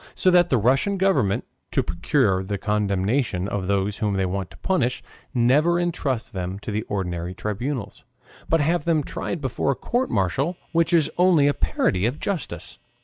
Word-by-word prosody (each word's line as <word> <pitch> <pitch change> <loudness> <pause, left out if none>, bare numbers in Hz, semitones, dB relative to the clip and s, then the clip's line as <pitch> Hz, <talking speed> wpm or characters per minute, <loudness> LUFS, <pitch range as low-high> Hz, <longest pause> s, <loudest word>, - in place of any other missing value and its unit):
So 185 - +3
that 175 -1 +5
the 130 - +3
Russian 135 - +2
Government, 185 - +2 0.2
to - - +1
procure 95 - +1
the 100 +2 -3
condemnation 100 0 0
of 100 -2 -3
those 100 +1 0
whom 105 -3 0
they 95 -1 +1
want 95 0 -3
to 85 - -15
punish, 130 - 0 0.3
never 145 +7 +3
intrust 140 -9 -2
them 95 0 -3
to - - -4
the 105 +1 -1
ordinary 90 -3 -3
tribunals, 110 +3 -4 0.5
but 165 -1 +3
have 160 +1 +1
them 160 -3 +2
tried 165 +3 -4
before 130 0 -1
a 140 - +2
court 245 - -1
martial, 135 - 0
which 170 0 +2
is 165 -3 +3
only 175 -5 +5
a 145 - +4
parody 95 -6 +1
of 130 +5 -3
justice. 155 - -4
120 Hz, 175 wpm, -24 LUFS, 95-160 Hz, 0.5 s, that